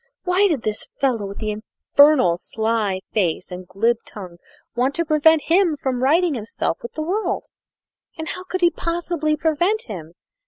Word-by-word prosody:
Why 375 +2 +3
did 305 - -1
this 215 0 -1
fellow, 245 -7 0
with 200 - -8
the 215 -1 -2
infernal 225 - +3
sly 215 0 -1
face 180 -3 -1
and 180 0 -8
glib 230 +6 +1
tongue, 180 -4 -10 0.4
want 255 +3 +1
to 335 - 0
prevent 310 0 +4
him 340 -2 +2
from 260 -3 -2
righting 325 +5 +3
himself 215 -7 -3
with 235 - -8
the 310 - -3
world, 390 +7 -1 0.7
and 320 0 -5
how 365 - -6
could 370 0 -3
he 345 -1 +5
possibly 335 -3 -1
prevent 345 +8 +1
him? 170 -8 -8
275 Hz, 165 wpm, -21 LUFS, 215-335 Hz, 0.7 s, he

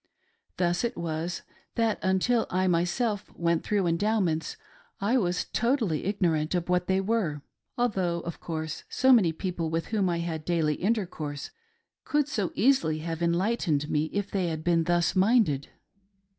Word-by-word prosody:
Thus 175 +1 +1
it 235 +1 -2
was, 165 +1 -3 0.3
that 225 -2 +1
until 190 +5 +2
I 185 +1 +1
myself 190 +5 0
went 170 -1 +1
through 205 -2 +1
the 175 - +1
Endowments, 175 -3 0 0.4
I 230 +6 +2
was 180 -4 0
totally 235 - +1
ignorant 175 -5 0
of 175 0 -2
what 180 0 +1
they 190 0 +2
were; 190 -8 -1 0.3
although, 190 -8 0
of 170 0 -6
course, 160 -1 -4
so 260 0 +4
many 195 -9 +5
people 170 -1 -3
with 165 +1 -2
whom 205 -4 +1
I 170 - 0
had 165 -2 -3
daily 160 -2 +1
intercourse 170 -7 -2 0.5
could 295 -1 +1
so 210 - -2
easily 260 - +3
have 165 0 -4
enlightened 170 -4 +1
me 150 +1 +2
if 200 +5 -3
they 190 -3 0
had 160 -1 -3
been 165 -1 +2
thus 175 +1 +1
minded. 190 - +3
175 Hz, 155 wpm, -27 LUFS, 165-210 Hz, 0.5 s, many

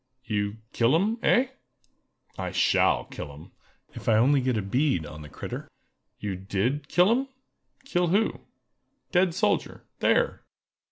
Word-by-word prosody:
"You 105 -2 -1 0.2
kill 120 +5 +3
'em—eh?" 225 +7 +2 0.9
"I - - -4
shall - - +3
kill 75 - -8
'em, 75 +3 -13 0.4
if - - -4
I 110 - +5
only 135 +5 +4
get 125 -2 0
a 105 - -1
bead 125 - +1
on 75 +1 -9
the 75 - -10
critter!" - - -7 0.5
"You 100 -2 -4
did 100 +10 -2
kill 180 +4 +4
'em?" 260 +3 +1 0.6
"Kill 180 -10 +1
who?" 200 +6 +1 0.7
"Dead 180 -2 +3
soldier—there!" - - 0
130 Hz, 130 wpm, -27 LUFS, -, 0.9 s, I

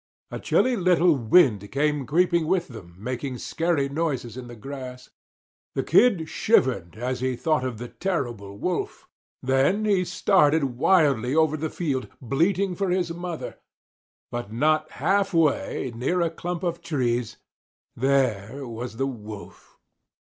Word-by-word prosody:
A - - -5
chilly 255 -1 +2
little 180 -4 +4
wind 115 - +3
came 145 -1 0
creeping 170 0 +2
with 180 -1 0
them 95 -8 -11
making 125 +4 -4
scary 160 0 0
noises 140 -6 -2
in 125 -1 -8
the 120 - -10
grass. 125 +1 -8 0.6
The - - 0
Kid 195 -11 +4
shivered 125 - +1
as 125 +3 -3
he 130 0 -1
thought 155 +1 0
of 130 -3 -3
the 120 +2 -7
terrible 120 - -3
Wolf. 180 - -3 0.4
Then 135 +11 +2
he 200 -3 +3
started 160 -5 +3 0.2
wildly 140 -8 +3
over 160 -1 +3
the 155 +1 -3
field, 140 -7 -2
bleating 175 - +1
for 195 +1 -1
his 180 -2 0
mother. 175 -1 -6 0.7
But 120 -3 -5
not 155 +6 +1
half 195 +5 +1
way, 150 -5 +1
near 130 +10 -1
a 165 -1 +1
clump 175 +2 -5
of 170 -1 -2
trees, 125 -6 -1 0.6
there 130 -1 0
was 120 -1 -6
the 135 - 0
Wolf! 110 -6 -9
140 Hz, 140 wpm, -25 LUFS, 125-170 Hz, 0.7 s, little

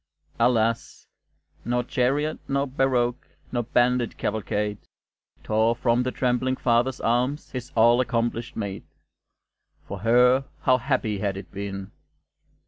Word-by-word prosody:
Alas! 115 -1 +1 0.6
nor 120 +1 0
chariot, 140 +6 0
nor 140 0 0
barouche, 130 -2 -1
Nor 120 -2 -1
bandit 120 0 +1
cavalcade 105 -1 -2 0.6
Tore 110 +2 +2
from 120 0 +2
the 130 - -1
trembling 130 +1 0
father's 120 +1 +1
arms 125 +6 0
His 130 0 -6
all 120 +2 +5
accomplished 120 -1 -2
maid. 100 -3 -4 1.1
For 100 - -6
her 125 +5 +4 0.2
how 130 -1 +3
happy 125 -5 -1
had 100 -1 -2
it 95 - -9
been! 100 0 -6
120 Hz, 120 wpm, -25 LUFS, 110-130 Hz, 1.1 s, all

